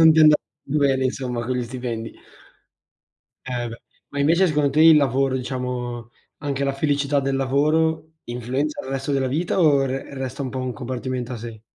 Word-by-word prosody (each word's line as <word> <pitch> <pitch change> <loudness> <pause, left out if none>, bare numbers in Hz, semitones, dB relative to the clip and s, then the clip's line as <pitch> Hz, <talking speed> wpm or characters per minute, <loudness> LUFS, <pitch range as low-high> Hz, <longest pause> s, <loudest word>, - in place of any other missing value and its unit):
non 160 -1 +8
ti 160 - +2
è - - +8
anda 155 -1 +8 0.3
bene 140 -2 +1
insomma, 125 -2 -2
con 130 - -1
gli 125 - -1
stipendi. 120 -2 -5 1.3
Eh 120 -1 -2
beh, 115 0 -9 0.3
ma 145 - -6
invece 165 +6 +4
secondo 150 -4 +2
te 150 +3 +2
il 160 -1 +9
lavoro, 135 -1 +2
diciamo, 125 -2 -4 0.3
anche 140 -1 -2
la 140 - +1
felicità 140 0 +1
del 135 0 -1
lavoro 155 +4 +1
influenza 125 +5 -2
il - - -8
resto 135 +1 -2
della 135 -1 +1
vita 160 +9 -1
o 145 -6 +4
re 135 +1 -4
resta 135 +1 -4
un 130 - -3
po' 130 - -4
un 130 -1 -2
compartimento 125 +1 -4
a 120 - -4
sé? 115 -1 -8
135 Hz, 190 wpm, -23 LUFS, 125-145 Hz, 1.3 s, il